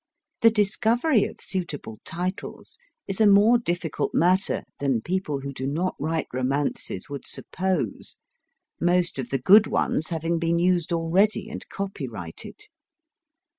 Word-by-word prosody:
The 230 - +8
discovery 225 +4 +2
of - - -9
suitable 150 - -4
titles 180 - -5 0.3
is 195 +2 +1
a 215 - +6
more 210 +4 +6
difficult 175 -7 -2
matter 185 +3 +2 0.2
than 135 -5 0
people 170 -6 -2
who 140 0 -6
do 130 0 -4
not 170 +6 -1
write 160 +2 -1
romances 130 -6 -2
would 140 -1 -7
suppose, 180 - -1 0.6
most 175 -3 +1
of 125 -2 -4
the 135 - 0
good 200 - +6
ones 155 - 0
having 165 0 -1
been 170 0 +1
used 175 -1 +1
already 185 +6 +1
and - - -7
copyrighted. 130 - -6
170 Hz, 130 wpm, -25 LUFS, 140-195 Hz, 0.6 s, The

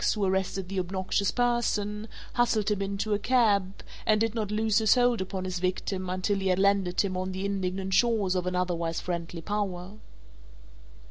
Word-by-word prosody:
who 205 -2 0
arrested 190 0 -1
the 195 0 -2
obnoxious 190 +2 0
person, 220 -3 0 0.3
hustled 220 -4 +2
him 205 -1 0
into 200 +2 -1
a 205 - +1
cab 205 -5 +2 0.2
and 215 -1 +3
did 225 0 +1
not 220 -3 -2
loose 215 0 +2
his 220 -2 +5
hold 245 -3 +3
upon 190 0 -4
his 185 -1 -3
victim 185 +1 -2
until 185 +2 0
he 195 - -1
had 185 -1 +2
landed 195 -2 +2
him 190 -2 -2
on 185 +1 -2
the 190 +1 -3
indignant 190 -1 -2
shores 220 -4 +3
of 180 -1 -1
an 180 - -1
otherwise 170 -2 -1
friendly 170 -1 -4
power. 195 -3 -3
195 Hz, 180 wpm, -28 LUFS, 185-210 Hz, 0.3 s, his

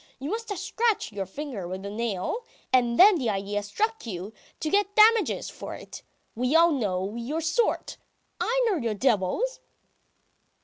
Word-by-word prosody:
You 275 +4 -5
must 455 +1 -4
have 405 - -3
scratched 440 - 0
your 195 -2 -4
finger 235 -4 -6
with 190 +2 -6
a - - -4
nail, 230 - -2 0.3
and 240 -2 +3
then 390 0 +8
the 245 -5 0
idea 205 0 -2
struck 425 - -2
you 195 +1 -6 0.3
to 310 - -2
get 405 0 +1
damages 440 +1 +5
for - - -7
it. - - -10 0.3
We 250 +6 0
all 335 +1 +6
know... 200 -7 -1
your 245 +7 -3
sort! 330 +9 0 0.4
I - - +1
know 405 -5 +2
you 230 -6 -2
devils!" 250 - 0
260 Hz, 165 wpm, -26 LUFS, -, 0.4 s, then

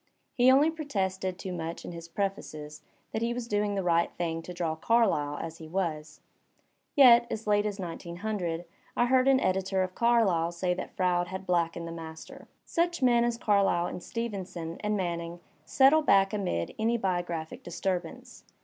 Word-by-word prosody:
He 245 +1 +5
only 285 +5 +5
protested 190 - -2
too 190 -1 -5
much 165 -1 -5
in - - -6
his 170 -1 -8
prefaces 165 -5 -4 0.3
that 220 - -2
he 235 +1 0
was 245 -1 -4
doing 205 -1 0
the 195 - -1
right 170 -1 +2
thing 165 -1 -2
to 180 - -9
draw 170 -2 -2
Carlyle 160 -7 +1
as 165 0 -6
he 160 - -9
was. 160 -3 -3 0.7
Yet, 240 -4 +7
as 220 - -4
late 205 0 +2
as 205 -1 -5
1900, 175 0 -4 0.3
1 240 - +3
heard 260 +1 +3
an 270 -1 +5
editor 190 -2 0
of 185 0 -4
Carlyle 195 -9 +2
say 180 +1 0
that - - -7
Froude 180 -1 +1
had 190 +1 -6
blackened 170 -2 0
the - - -6
Maister. 160 -1 -9 0.2
Such 340 -3 0
men 240 -2 +5
as 240 -1 0
Carlyle 200 -6 +2
and 180 - -5
Stevenson 185 -7 -5
and 210 0 -1
Manning 170 -2 -3 0.3
settle 280 +4 +5
back 195 -8 +4
amid 180 - -2
any 230 +2 +2
biographic 175 -5 -3
disturbance. 175 0 -4
190 Hz, 170 wpm, -29 LUFS, 170-225 Hz, 0.7 s, Yet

